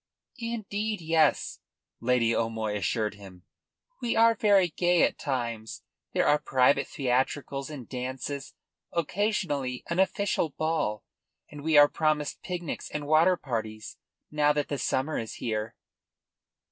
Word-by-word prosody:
"Indeed 220 -2 -3
yes," 160 -1 +2 0.4
Lady 115 -1 +2
O'Moy 110 -2 -1
assured 105 +2 -1
him. 95 -3 -13 0.6
"We 240 -2 0
are 230 0 +6
very 200 -4 +4
gay 175 +2 +2
at - - +1
times. 115 -5 -3 0.3
There - - +2
are 150 - +4
private 130 -2 +3
theatricals 135 +1 -1
and 140 -6 -8
dances, 130 +2 -5 0.4
occasionally 170 - -1
an 170 - 0
official 190 -3 +1
ball, 155 -10 -1 0.5
and 145 -1 -9
we 160 -1 +3
are 145 0 +9
promised 155 -1 -1
picnics 175 -3 -5
and 150 -1 -4
water 160 +5 +4
parties 110 -6 -5 0.3
now 150 -1 +3
that 145 -1 -1
the 145 - -2
summer 135 +5 0
is 115 - -6
here." 110 0 -3
145 Hz, 130 wpm, -28 LUFS, 120-170 Hz, 0.6 s, are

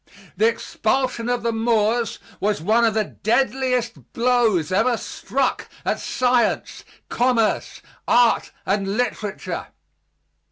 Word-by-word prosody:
The 220 - +3
expulsion 235 +1 -1
of 245 -1 -1
the 235 - +1
Moors 225 0 +1 0.2
was 205 0 0
one 220 +8 +3
of 220 -2 +1
the 215 - +2
deadliest 250 +1 -1
blows 230 -9 +2
ever 235 +6 +2
struck 265 +4 -2 0.2
at - - 0
science, 250 -1 0 0.2
commerce, 240 -3 0 0.2
art 240 -1 +3 0.2
and 195 +1 -1
literature. 215 -4 -3
230 Hz, 110 wpm, -22 LUFS, 215-245 Hz, 0.2 s, The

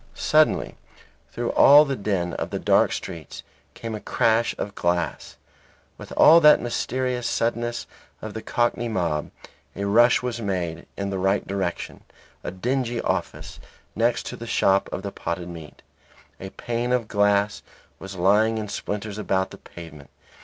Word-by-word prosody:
Suddenly - - +2 0.5
through - - -2
all 145 +2 +7
the 140 -2 -2
din 95 -5 -2
of - - -4
the - - -3
dark - - +3
streets 85 -6 -7 0.3
came 115 -1 -6
a 105 - -4
crash 115 +3 +1
of 100 - -5
glass. 85 0 -2 0.6
With - - -10
that 155 -2 +7
mysterious 125 +1 -2
suddenness 120 +1 -1 0.3
of 110 -1 -7
the 110 - -6
Cockney 120 +1 -1
mob, 85 -8 -2 0.5
a 100 - -3
rush 120 +5 +4
was 120 -2 -3
made 90 -5 -3
in 100 0 -3
the 95 - -3
right 95 +2 +1
direction, 95 -3 -4 0.4
a - - -3
dingy 120 +4 -2
office, - - -3 0.4
next 115 +1 +1
to - - -6
the 115 - -9
shop 95 -3 +2
of 95 - -5
the 100 - -4
potted 85 -1 -5
meat. 80 -3 -11 0.6
The 95 - -7
pane 120 +4 -3
of 120 -4 0
glass 100 0 +1 0.4
was 95 0 -8
lying 105 +5 +3
in 105 -2 -4
splinters 105 0 -5
about 95 -2 -1
the - - -11
pavement. 75 -4 -12
105 Hz, 155 wpm, -24 LUFS, 95-120 Hz, 0.6 s, all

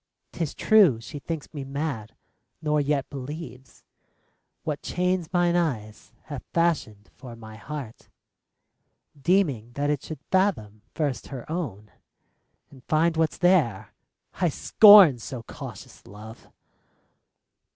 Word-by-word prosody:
'T - - -8
is 160 - -2
true 195 - +4
she 145 +6 -9
thinks 160 +3 -6
me 145 -3 -5
mad, 135 -5 -5 0.4
nor 150 -1 +1
yet 140 -1 -1
believes 135 -1 -9 0.8
What 150 -2 -3
chains 180 -2 -1
mine 175 -1 +2
eyes 115 -11 -3
have 145 -4 -7
fashioned 145 -12 -1
for 125 -4 -11
my 110 -1 -12
heart, 130 0 -8 1.1
Deeming 140 - 0
that 145 +3 -1
it 145 -2 -2
should 150 -3 -9
fathom 160 - 0
first 145 -6 -2
her 130 -4 -8
own 110 - -5 0.8
And 130 -3 -16
find 160 +2 +2
what 160 -1 +1
's - - -12
there: 140 - +2 0.4
I 180 - 0
scorn 195 - +7
so 120 +1 -7
cautious - - -11
love 110 +4 -12
145 Hz, 125 wpm, -25 LUFS, 120-165 Hz, 1.1 s, scorn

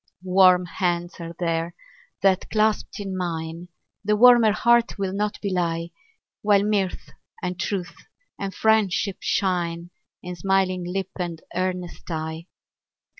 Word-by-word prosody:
Warm 185 -1 +5
hands 175 0 -2
are 170 0 -7
there, 165 0 -1 0.5
that, 190 -1 +3
clasped 215 -1 0
in 195 -2 -4
mine, 165 -1 -4 0.4
The 210 +1 +2
warmer 240 -1 +7
heart 235 +2 +3
will 195 -1 -2
not 205 +1 -1
belie; 170 -3 -1 0.5
While 205 -1 +4
mirth, 205 -3 -1 0.3
and 180 -1 -3
truth, 185 -1 -3 0.4
and 195 -1 -3
friendship 205 -1 +2
shine 175 -2 -1 0.3
In 180 0 -5
smiling 185 0 +1
lip 190 0 -3
and 170 -2 -3
earnest 180 0 -3
eye. 160 +1 -4
185 Hz, 125 wpm, -24 LUFS, 175-200 Hz, 0.5 s, warmer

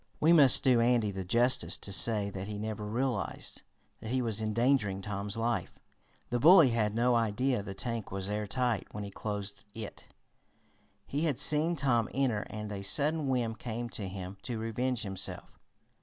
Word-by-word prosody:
We 160 +3 +4
must 140 -6 +8
do 125 -3 +4
Andy 115 -3 +2
the 95 -1 -5
justice 115 -3 +2
to 100 - -6
say 105 0 +1
that 95 0 -6
he 105 -1 -5
never 105 0 -5
realized 125 +4 -3 0.4
that 110 - -8
he 130 +2 0
was 110 -3 0
endangering 110 -3 0
Tom's 100 0 -4
life. 115 +1 -2 0.5
The 120 - 0
bully 165 0 +7
had 110 -2 0
no 120 +2 +2
idea 115 +2 0
the 100 -1 -8
tank 115 -2 -4
was 95 0 -4
airtight 105 +3 -2
when 105 - -4
he 100 - -7
closed 100 -1 -6
it. 110 -2 -9 1.0
He 145 +4 -2
had 145 -6 0
seen 155 +4 +4
Tom 125 -6 +1
enter 125 -6 0
and 105 -1 -6
a 100 -1 -5
sudden 145 +9 0
whim 120 -4 0
came 120 +1 -6
to 100 -3 -5
him 95 0 -7
to 120 0 -4
revenge 115 +2 -2
himself. 95 -2 -3
115 Hz, 170 wpm, -30 LUFS, 105-125 Hz, 1.0 s, must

